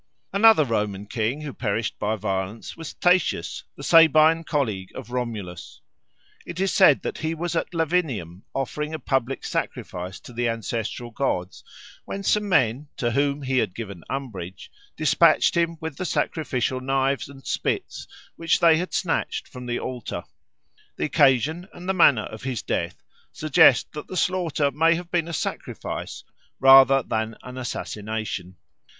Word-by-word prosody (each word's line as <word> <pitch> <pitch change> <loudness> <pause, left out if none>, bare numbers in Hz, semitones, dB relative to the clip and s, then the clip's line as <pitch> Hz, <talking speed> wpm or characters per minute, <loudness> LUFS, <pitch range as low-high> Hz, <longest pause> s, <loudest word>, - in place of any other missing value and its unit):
Another 205 -5 +6
Roman 105 -4 -2
king 115 +7 -2
who 145 -3 -6
perished 110 -1 -2
by 105 +1 0
violence 100 +1 -4
was 165 -1 -8
Tatius, 180 - +1
the - - -10
Sabine 165 0 +6
colleague 110 - -2
of 120 -2 -8
Romulus. 110 -8 -5 0.6
It 170 +1 -7
is 195 0 +1
said 170 -8 +5
that - - -4
he 160 +1 -2
was 170 +1 -3
at - - -1
Lavinium 150 - -1
offering 150 +3 -3
a - - -3
public 135 -2 -1
sacrifice 90 +1 -4
to 125 - -12
the 120 0 0
ancestral 115 +1 -4
gods, 95 -8 -2 0.4
when 195 - -6
some 210 +1 +1
men, 130 - +2
to 120 -4 0
whom 140 +3 0
he 130 -1 +1
had 105 -6 -1
given 100 -7 -7
umbrage, 100 -10 -6 0.3
despatched - - +4
him 170 -1 +1
with 160 -3 -6
the 185 - -3
sacrificial 130 -6 -1
knives 135 0 0
and 135 -1 -14
spits - - -2 0.3
which 165 -1 +1
they 165 -2 +6
had 180 +3 -3
snatched 170 -3 -1
from 125 -1 -9
the 120 - -1
altar. 120 -9 -5 0.7
The - - -1
occasion 150 +4 +2
and 180 -3 -10
the 190 - +2
manner 140 - +5
of 110 - -9
his 130 -3 -3
death - - -3 0.3
suggest 150 -4 +4
that 150 - -8
the 185 - -5
slaughter 165 -6 +1
may 165 +4 +3
have 175 +1 -7
been 170 -2 +1
a - - -5
sacrifice 145 - -5 0.4
rather 135 0 +7
than 110 0 -3
an 125 0 -8
assassination. 110 -6 -4
135 Hz, 155 wpm, -24 LUFS, 110-160 Hz, 0.7 s, rather